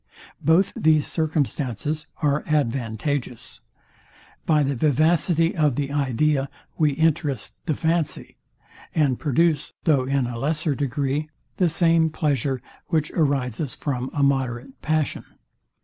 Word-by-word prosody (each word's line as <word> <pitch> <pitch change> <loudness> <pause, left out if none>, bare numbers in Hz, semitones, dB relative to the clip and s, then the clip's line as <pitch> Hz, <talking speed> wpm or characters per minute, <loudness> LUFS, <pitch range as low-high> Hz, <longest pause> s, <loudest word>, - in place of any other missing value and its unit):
Both 165 +6 +3
these 155 -2 +3
circumstances 150 - -2 0.2
are 145 0 +2
advantageous. 130 -2 -2 0.9
By 155 -2 +4
the 140 0 0
vivacity 160 - +2
of 150 -6 +2
the 140 0 -2
idea 140 0 +1 0.3
we 150 -3 +2
interest 145 -4 -1
the 155 - +1
fancy, 165 0 -1 0.6
and 140 -6 +2
produce, 150 +1 +1
though 140 -6 +3
in 135 -1 +1
a 120 -1 -5
lesser 150 +2 0
degree, 140 +2 -1 0.3
the 180 -3 +3
same 165 0 +3
pleasure, 140 -4 -1 0.2
which 155 -3 0
arises 140 -3 0
from 130 -3 -3
a 145 - 0
moderate 135 -1 -1
passion. 155 -1 -1
145 Hz, 115 wpm, -23 LUFS, 135-155 Hz, 0.9 s, By